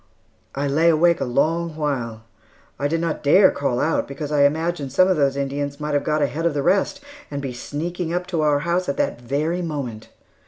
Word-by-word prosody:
I 140 +1 -1
lay 160 +4 +3
awake 170 +1 +3
a - - +1
long 160 +6 0
while. 125 -8 -3 0.6
I 145 - +1
did 165 +3 0
not 165 -2 -2
dare 185 +7 +6
call 130 -4 -1
out 160 - 0
because 140 +2 -6
I 145 -1 +4
imagined 155 -1 -1
some 185 +7 +4
of 190 - +3
those 140 -3 +1
Indians 140 +1 -3
might 150 0 -3
have 145 - +1
got 155 -1 +1
ahead 160 +4 0
of 155 - -2
the 140 - 0
rest 200 - +1 0.3
and 145 - -4
be 135 -3 -4
sneaking 165 +7 -4
up 180 +1 -1
to 165 - +1
our 145 -1 +2
house 175 +2 0
at 140 - -2
that 120 - -1
very 150 +8 -1
moment. 140 -10 -5
150 Hz, 210 wpm, -22 LUFS, 140-165 Hz, 0.6 s, dare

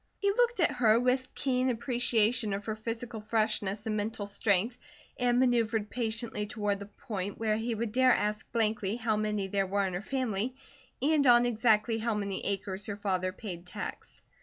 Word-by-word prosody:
He 400 0 +2
looked 475 +1 +2
at 340 - +4
her 225 -2 +4
with 255 +1 +1
keen 255 -1 +1
appreciation 235 -2 +1
of 200 +1 -4
her 220 - -2
physical 225 0 -5
freshness 215 -1 0
and 220 -1 -1
mental 210 0 -2
strength, 205 +3 0 0.4
and 245 -1 +3
manoeuvred 230 -4 +2
patiently 225 -2 -3
toward 205 -3 -1
the 200 - -8
point 205 -2 -5
where 220 -1 +1
he 230 +1 -2
would 225 0 -2
dare 255 +2 +5
ask 210 -2 0
blankly 215 -3 0
how 225 -2 0
many 210 -2 -1
there 195 0 0
were 200 +1 +1
in 185 - -3
her 180 - -2
family, 245 -1 -2 0.5
and 290 -1 +3
on 240 0 +7
exactly 225 -1 +2
how 225 0 0
many 200 -2 -3
acres 195 0 -2
her 205 -1 -4
father 185 -3 -1
paid 180 -4 -8
tax. 180 - -7
220 Hz, 180 wpm, -30 LUFS, 205-240 Hz, 0.5 s, on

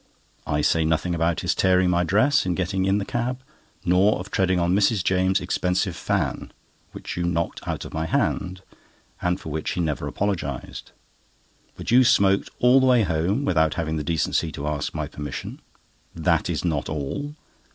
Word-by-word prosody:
I 75 - 0
say 80 +2 +2
nothing 80 +2 0
about 85 0 0
his - - +1
tearing 90 -1 +3
my 85 0 +2
dress 130 +10 +3
in 90 -2 -1
getting 95 +2 -1
in 95 +1 +2
the 100 - -2
cab, 125 +2 -3 0.4
nor 90 +4 +4
of 95 +3 -8
treading 95 -1 +1
on 85 +1 +1
Mrs. 100 0 +2
James's 95 +1 +1
expensive 90 0 0
fan, - - -2 0.4
which - - -7
you 85 - -2
knocked 85 -1 -1
out - - -3
of - - -9
my 80 +1 -2
hand, 90 +2 -1 0.6
and 90 +1 0
for - - -8
which 80 +1 -3
he - - -4
never 80 -4 -1
even - - -3
apologised; 85 -11 -4 0.8
but - - -5
you 125 +2 +7
smoked 100 -6 +3
all 125 +2 +5
the 130 - +3
way 125 -3 +5
home 90 - 0
without 80 -4 +2
having 80 -2 -2
the 75 - -3
decency 80 0 0
to 70 - -5
ask 75 -1 -3
my - - -2
permission. 75 0 -7 0.5
That - - +1
is - - -2
not 80 -4 -1
all! 80 - -4
90 Hz, 185 wpm, -24 LUFS, 80-100 Hz, 0.8 s, you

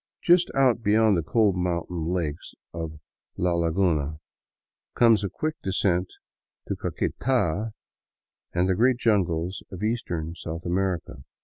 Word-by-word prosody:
Just 175 0 +5
out 130 -4 +3
beyond 110 -1 +4
the 85 - +1
cold 105 +2 +2
mountain 85 -2 -2
lakes 85 -4 -3 0.2
of 80 -2 -5 0.4
La 90 0 +1
Laguna 80 -3 +1 0.8
comes 115 -3 +5
a 100 - -1
quick 155 - -2
descent 95 -1 +1 0.6
to - - -1
Caqueta 115 -5 -1 0.8
and 90 +1 +1
the 95 - +3
great 120 +6 +3
jungles 95 -6 0
of 95 +1 -7
eastern 85 -8 -2
South 85 0 -7
America. 90 -1 -2
90 Hz, 125 wpm, -26 LUFS, 85-110 Hz, 0.8 s, Just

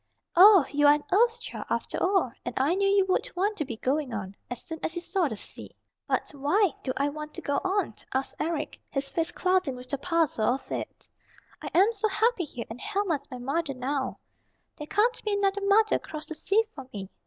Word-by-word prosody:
"Oh, 380 -3 +9
you 290 0 +4
are 290 - +8
an 295 - -5
Earth 460 +5 +4
Child, - - -7
after - - -2
all, 370 -9 +2
and 245 - -5
I 275 +6 +3
knew 395 +1 +2
you 395 -1 +4
would 385 +6 +1
want 405 +4 +1
to 300 - -1
be 235 -4 -6
going 265 0 -1
on, 200 -2 -5
as 245 - -6
soon 325 -2 -6
as 330 - -2
you 345 - -3
saw 350 0 0
the 220 - -4
sea." - - -9 0.3
"But - - -1
why 300 +6 +2
do 260 - -2
I 280 - +2
want 300 +1 -7
to - - -6
go 285 - 0
on?" 380 - 0 0.2
asked 265 +1 -1
Eric, 315 -1 -2
his 275 0 -2
face 330 +1 -1
clouding 365 -8 +1
with 250 0 -11
the 280 - -2
puzzle 310 -9 +1
of 270 - -11
it. - - -5 0.5
"I - - -5
am 395 +6 +5
so 435 0 +1
happy 435 -2 +1
here, 245 -5 -7
and 225 +3 -9
Helma 400 -4 0
is 290 - -4
my 255 - -6
mother 275 +3 -2
now. 265 +1 -2 0.6
There 300 - -8
can't 460 +7 +1
be 425 - 0
another 400 0 +1
mother 420 +2 +4
across 305 -1 -8
the - - -5
sea 395 +8 +2
for 265 -2 -10
me. 195 -2 -7
320 Hz, 220 wpm, -27 LUFS, 270-395 Hz, 0.6 s, Oh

